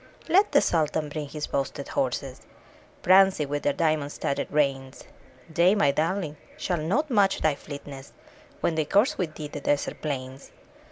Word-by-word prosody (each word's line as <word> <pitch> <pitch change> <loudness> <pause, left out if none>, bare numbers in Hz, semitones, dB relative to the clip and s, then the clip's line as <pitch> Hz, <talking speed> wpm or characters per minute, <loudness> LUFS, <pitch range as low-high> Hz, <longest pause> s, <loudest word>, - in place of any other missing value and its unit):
Let 385 +5 +4
the 285 - +5
Sultan 155 -2 0
bring 150 -1 -5
his 150 +1 -4
boasted 140 0 -3
horses. 130 0 -2 0.6
Prancing 185 -5 +5
with 145 0 -2
their 145 - +1
diamond 155 -2 0
studded 140 - -3
reins; 135 -3 -1 0.4
They, 170 +5 +3
my 145 -9 +3
darling, 155 +1 -1 0.2
shall 175 -3 -1
not 250 - 0
match 205 -4 +3
thy 155 - +3
fleetness 140 -1 -9 0.5
When 170 - +1
they 155 -1 0
course 205 - +2
with 165 -4 -2
thee 150 - -6
the 145 0 -7
desert 145 0 -1
plains! 135 -2 -5
150 Hz, 160 wpm, -26 LUFS, 140-180 Hz, 0.6 s, the